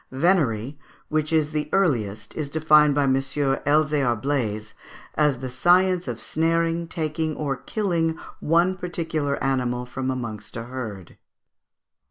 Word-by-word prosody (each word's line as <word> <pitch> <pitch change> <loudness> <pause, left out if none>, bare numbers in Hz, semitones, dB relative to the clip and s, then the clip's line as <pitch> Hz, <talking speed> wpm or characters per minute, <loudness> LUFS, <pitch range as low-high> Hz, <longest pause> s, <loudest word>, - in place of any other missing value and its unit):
Venery, 140 - +1 0.3
which 155 0 0
is 155 -2 +2
the 150 -1 -2
earliest, 110 - 0
is 150 -3 -3
defined 150 -1 +4
by 145 - +3
M. 135 -1 +3
Elzéar 135 -1 +1
Blaze 110 -6 -2 0.4
as 150 -3 +2
"the 130 - -3
science 180 +6 +3
of 120 -2 -4
snaring, 165 +1 0
taking, 155 -2 -2
or 140 -3 -2
killing 165 - -1 0.2
one 170 +4 +2
particular 165 -5 -2
animal 125 -2 0
from 130 +1 -4
amongst 110 -5 -5
a 115 - -4
herd." 115 -7 -7
145 Hz, 130 wpm, -24 LUFS, 125-160 Hz, 0.4 s, defined